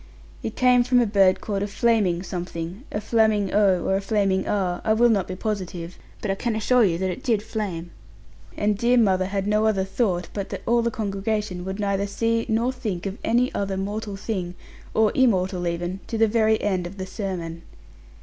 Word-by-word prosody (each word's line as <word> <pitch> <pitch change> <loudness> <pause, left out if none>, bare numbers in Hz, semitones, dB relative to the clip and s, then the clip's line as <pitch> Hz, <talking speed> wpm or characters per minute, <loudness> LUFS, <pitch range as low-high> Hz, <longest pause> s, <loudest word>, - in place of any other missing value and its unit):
It 220 - -5
came 250 -1 +4
from 250 0 +3
a 240 - +4
bird 195 -3 +3
called 200 -2 -2
a 205 - -1
flaming 200 -5 +1
something 175 - -5
a 210 - -2
flaming 215 -2 +2
oh, 195 -4 +3
or 190 - +2
a - - -2
flaming 195 -2 +1
ah, 185 -3 0
I 220 - +3
will 240 +2 +4
not 200 -5 +1
be 185 - -5
positive 185 -4 -4 0.2
but 205 - 0
I - - +2
can 225 +3 -2
assure 240 +3 +3
you 175 -5 +2
that 185 +1 -1
it 255 - -6
did 225 -6 +1
flame; 195 -6 -4 0.7
and 210 0 +1
dear 240 +4 +2
mother 190 -5 +3
had 195 0 -2
no 210 +1 +2
other 195 -3 +2
thought, 190 -3 -1
but 200 -2 -4
that - - -6
all 235 0 +3
the 235 - +1
congregation 205 -3 -2
would 190 +2 -4
neither 200 -1 0
see 230 +3 0
nor 230 +3 +1
think 215 -9 -4
of 195 +1 -4
any 245 +2 +2
other 195 -1 -2
mortal 205 +1 -3
thing, 190 -3 -4 0.4
or 220 -1 +4
immortal 185 -8 +2
even, 175 +2 -3
to 225 - -3
the 225 0 +4
very 220 0 +2
end 185 -4 0
of 195 +3 -11
the 185 - -4
sermon. 185 -4 -5
200 Hz, 205 wpm, -24 LUFS, 185-220 Hz, 0.7 s, came